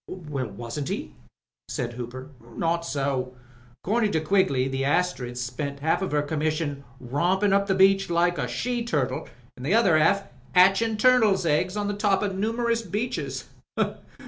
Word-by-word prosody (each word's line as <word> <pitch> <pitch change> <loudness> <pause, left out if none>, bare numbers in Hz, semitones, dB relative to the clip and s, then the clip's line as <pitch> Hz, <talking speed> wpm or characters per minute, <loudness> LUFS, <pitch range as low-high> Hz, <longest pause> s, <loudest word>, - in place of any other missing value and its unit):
Wasn't 140 -5 -5
he?" 60 0 -4 0.5
said 120 -1 -3
Hooper. 125 +3 -7 0.3
Not 170 0 0
so. 135 -3 -2 0.5
A^cordin' 215 +1 +1
to 160 - +2
Quigley 155 -6 +2
the 135 0 -2
Astriid 140 -5 0
spent 140 +4 -4
half 160 +2 +2
her 150 -6 0
commission 155 -1 -2 0.2
rompin' 180 +11 +1
up 200 0 +2
the 190 - +2
beach 195 0 +4
like 175 +1 +2
a - - -1
she 245 -1 -2
turtle, 150 - -2 0.3
an' 125 - -12
the 155 +11 +1
other 190 -9 +4
half 195 +6 +3 0.3
patching 195 +5 +5
turtles' 215 -6 +4
eggs 180 +5 +1
on 205 -1 -1
the 205 - -1
top 205 0 +1
o' - - +1
numerous 230 +4 0
reefs. 175 - -3
170 Hz, 150 wpm, -25 LUFS, 140-200 Hz, 0.5 s, patching